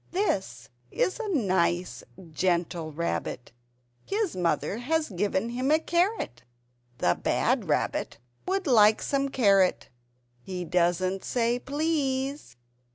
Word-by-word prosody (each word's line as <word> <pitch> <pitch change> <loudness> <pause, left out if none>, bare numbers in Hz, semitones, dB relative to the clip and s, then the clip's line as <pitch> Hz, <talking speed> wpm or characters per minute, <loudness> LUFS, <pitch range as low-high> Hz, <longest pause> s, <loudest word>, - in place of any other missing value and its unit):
This 190 - -2 0.2
is 370 - -1
a 450 - -3
nice 180 - 0 0.3
gentle 170 -1 -1
Rabbit. 155 -5 -3 0.5
His 410 -2 -1
mother 180 +4 0
has 310 +5 0
given 200 +3 -1
him 255 +3 -1
a 310 - +5
carrot. 345 - -1 0.6
The 90 - +2
bad - - +1
Rabbit - - -1 0.3
would 385 +1 0
like 220 -6 +5
some 275 0 0
carrot. 200 -8 +3 0.5
He 180 +4 -5
doesn't 180 +2 +1
say 240 0 0
"Please." 275 - -2
215 Hz, 110 wpm, -27 LUFS, 175-290 Hz, 0.6 s, a